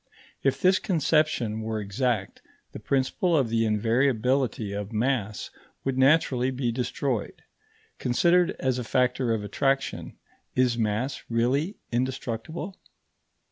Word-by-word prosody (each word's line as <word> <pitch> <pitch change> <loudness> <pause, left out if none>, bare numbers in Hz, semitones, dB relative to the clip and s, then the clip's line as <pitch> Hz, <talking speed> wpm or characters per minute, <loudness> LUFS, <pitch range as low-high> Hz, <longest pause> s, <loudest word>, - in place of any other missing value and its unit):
If - - +1
this 185 0 +4
conception 155 - +1
were 110 0 -2
exact, 105 0 -2 0.3
the - - -8
principle 140 +6 +1
of 130 -5 +1
the 115 0 +2
invariability 115 0 +1
of 100 +1 -4
mass 110 -2 -1 0.3
would 135 -1 -1
naturally 130 -2 +3
be 130 -2 -1
destroyed. 125 -1 -2 0.6
Considered 170 +8 +3
as 130 -1 0
a - - -3
factor 125 +1 +1
of 110 -2 0
attraction, 135 +6 -1 0.4
is 125 -2 +3
mass 115 +4 -1
really 130 - +1 0.2
indestructible? 130 - -3
125 Hz, 115 wpm, -26 LUFS, 115-135 Hz, 0.6 s, this